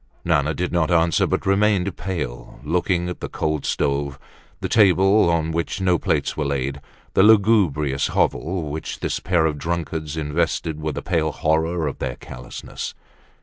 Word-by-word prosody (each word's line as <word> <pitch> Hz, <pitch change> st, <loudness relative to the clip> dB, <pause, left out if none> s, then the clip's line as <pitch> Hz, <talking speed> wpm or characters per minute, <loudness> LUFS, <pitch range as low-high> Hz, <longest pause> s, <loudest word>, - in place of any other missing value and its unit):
Nana 80 Hz, -2 st, +2 dB
did 90 Hz, 0 st, -2 dB
not 85 Hz, -2 st, +1 dB
answer, 85 Hz, -1 st, +3 dB
but -, -, -1 dB
remained 100 Hz, -1 st, +2 dB
pale, 75 Hz, -11 st, -5 dB
looking 90 Hz, +3 st, 0 dB
at 90 Hz, -, -5 dB
the -, -, -5 dB
cold 75 Hz, -2 st, -2 dB
stove, 70 Hz, 0 st, -1 dB, 0.4 s
the -, -, -2 dB
table 95 Hz, -2 st, +4 dB
on 80 Hz, -1 st, +1 dB
which 85 Hz, +4 st, -2 dB
no 90 Hz, -3 st, +2 dB
plates -, -, 0 dB
were 75 Hz, -, -1 dB
laid, 70 Hz, 0 st, -2 dB, 0.3 s
the -, -, +4 dB
lugubrious 95 Hz, -10 st, +4 dB
hovel 80 Hz, -3 st, -1 dB
which 80 Hz, +2 st, -5 dB
this -, -, -1 dB
pair 85 Hz, -3 st, +1 dB
of 75 Hz, -2 st, -1 dB
drunkards 80 Hz, -2 st, -3 dB
invested 80 Hz, +1 st, -1 dB
with 75 Hz, -1 st, -3 dB
the -, -, -4 dB
pale 80 Hz, -3 st, 0 dB
horror 80 Hz, +2 st, 0 dB
of 70 Hz, -, -5 dB
their -, -, -3 dB
callousness. 60 Hz, -1 st, -8 dB
80 Hz, 160 wpm, -22 LUFS, 75-90 Hz, 0.4 s, table